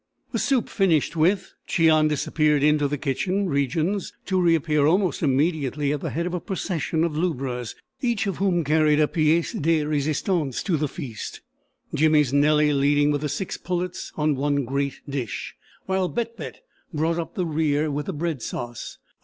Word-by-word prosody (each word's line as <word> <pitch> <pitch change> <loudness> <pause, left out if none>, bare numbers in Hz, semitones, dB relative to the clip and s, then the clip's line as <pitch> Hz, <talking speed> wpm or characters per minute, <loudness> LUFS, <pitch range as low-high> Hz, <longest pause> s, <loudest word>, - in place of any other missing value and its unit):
The - - -1
soup 265 -5 +1
finished 170 -6 +1
with, 185 +5 +1
Cheon 160 -2 +4
disappeared 150 -1 +1
into 150 -1 +3
the 145 +1 -2
kitchen 185 +9 -1
regions, 160 +6 -1
to 185 -1 +1
reappear 160 -4 +3
almost 180 -1 +2
immediately 145 0 +1
at 145 - -3
the - - -3
head 170 +3 -2
of 180 - -3
a 180 - -1
procession 170 -3 -2
of 165 -3 -1
lubras, 135 -8 -2 0.3
each 235 -4 0
of 195 - -2
whom 185 -4 +1
carried 155 0 +3
a 150 - +4
piece 160 +1 +1
de 160 0 +1
resistance 150 0 -1
to 185 - +1
the 150 0 0
feast: 130 - -7 0.5
Jimmy's 150 -3 +3
Nellie 150 +1 +4
leading 145 +1 +3
with 145 -1 -1
the 150 - -2
six 145 +7 -3
pullets 180 0 -4
on 150 -1 +2
one 140 0 0
great 140 +2 -2
dish, 135 -6 -4 0.3
while 190 -1 0
Bett 230 -1 -3
Bett - - -8 0.3
brought 165 +1 0
up 165 - -5
the 180 - 0
rear 155 -1 0
with 145 +1 -3
the 190 - -2
bread 160 -3 -3
sauce. 120 0 -6
155 Hz, 170 wpm, -24 LUFS, 145-175 Hz, 0.5 s, Cheon